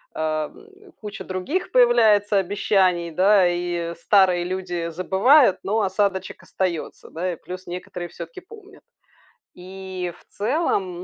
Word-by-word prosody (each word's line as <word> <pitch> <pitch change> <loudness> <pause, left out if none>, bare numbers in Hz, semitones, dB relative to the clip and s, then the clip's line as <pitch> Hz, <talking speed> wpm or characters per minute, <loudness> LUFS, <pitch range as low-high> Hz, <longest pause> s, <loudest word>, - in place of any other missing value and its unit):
эм, 260 - -5
куча 210 -2 -7
других 185 - -3
появляется 220 - +4
обещаний, 185 -2 +1
да, 190 +3 +4
и 175 -1 -3
старые 185 -1 +3
люди 175 -2 -3
забывают, 195 - +4
но 215 +2 0
осадочек 190 0 -1
остается, 180 -4 -4
да, 180 +2 -3
и - - -6
плюс 185 +3 -9
некоторые 175 0 -6
всё-таки 170 -1 -9
помнят. 410 0 -16 0.7
И 185 0 -6
в - - -25
целом, 200 - -1
185 Hz, 120 wpm, -23 LUFS, 175-210 Hz, 0.7 s, появляется